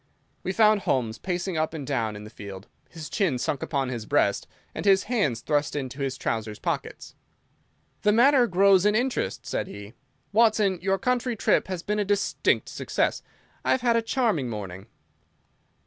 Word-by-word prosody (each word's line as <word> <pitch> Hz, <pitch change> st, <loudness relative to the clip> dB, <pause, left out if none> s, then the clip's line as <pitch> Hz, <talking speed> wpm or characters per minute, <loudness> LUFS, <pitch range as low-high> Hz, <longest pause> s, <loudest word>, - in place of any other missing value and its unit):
We -, -, -2 dB
found 215 Hz, 0 st, +4 dB
Holmes 115 Hz, -8 st, -1 dB
pacing 180 Hz, -1 st, -3 dB
up 155 Hz, +1 st, -1 dB
and 145 Hz, -3 st, -5 dB
down 115 Hz, -6 st, -1 dB
in 105 Hz, -, -8 dB
the 105 Hz, -, -11 dB
field, 100 Hz, -1 st, -9 dB, 0.2 s
his 160 Hz, -2 st, -8 dB
chin 185 Hz, -, 0 dB
sunk 135 Hz, +2 st, -2 dB
upon 135 Hz, -3 st, -1 dB
his 115 Hz, -4 st, -5 dB
breast, -, -, +1 dB, 0.3 s
and -, -, -5 dB
his 195 Hz, -1 st, +4 dB
hands 195 Hz, -, 0 dB
thrust 145 Hz, +4 st, 0 dB
into 135 Hz, -1 st, -4 dB
his 135 Hz, -2 st, -2 dB
trousers 110 Hz, -2 st, -3 dB
pockets. -, -, -4 dB, 0.9 s
"The 210 Hz, -, +4 dB
matter 245 Hz, +3 st, +5 dB
grows 195 Hz, -1 st, +4 dB
in 210 Hz, +1 st, +3 dB
interest," 245 Hz, -, -1 dB
said -, -, -2 dB
he. 100 Hz, +2 st, -10 dB, 0.4 s
"Watson, 210 Hz, -4 st, +3 dB
your 195 Hz, +1 st, +1 dB
country 250 Hz, +3 st, 0 dB
trip -, -, +2 dB
has 185 Hz, -2 st, -4 dB
been 210 Hz, +1 st, -1 dB
a -, -, +2 dB
distinct 200 Hz, 0 st, +1 dB
success. -, -, -1 dB, 0.4 s
I -, -, -2 dB
have 260 Hz, -, 0 dB
had 240 Hz, -1 st, +3 dB
a 230 Hz, -, +3 dB
charming 225 Hz, -, 0 dB
morning." 95 Hz, -3 st, -7 dB
180 Hz, 175 wpm, -26 LUFS, -, 0.9 s, matter